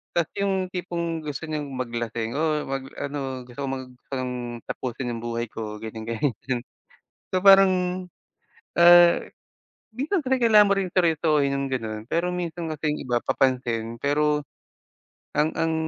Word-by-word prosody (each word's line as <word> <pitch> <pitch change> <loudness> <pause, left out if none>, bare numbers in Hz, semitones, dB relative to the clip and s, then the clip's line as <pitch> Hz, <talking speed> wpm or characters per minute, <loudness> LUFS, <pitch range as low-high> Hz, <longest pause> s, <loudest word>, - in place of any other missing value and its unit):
tapos 170 -2 +1
yung 190 -2 0
tipong 170 -2 -3
gusto 150 -1 -6
niyong 150 -3 -4
maglasing, 120 -2 -3
oh, 155 -1 +1
mag 135 0 -4
ano, 135 -3 -4
gusto 125 +1 -13
kong 135 - -2
mag 130 -1 -6 0.2
parang 130 -2 -3 0.3
tapusin 125 0 -4
yung 115 - -4
buhay 115 0 -3
ko, 105 -1 -5
ganyan, 110 0 -7
ganyan. 120 +1 -2 0.7
So 185 - +3
parang, 185 -2 +5 0.7
ah, 175 0 +8 0.7
minsan 295 - -1
kasi 265 0 +1
kailangan 215 -4 +6
mo - - +5
rin 190 - -1
seryosohin 155 -5 +3
yung 140 - -1
gano'n, 110 -4 -4
pero 170 +5 0
minsan 170 -2 -3
kasi 150 0 -1
yung - - -7
iba 120 -1 +1
papansin, 120 -3 0
pero 150 +1 +1 0.9
ang 150 +2 +1
ang 165 0 +1
150 Hz, 145 wpm, -25 LUFS, 125-175 Hz, 0.9 s, ah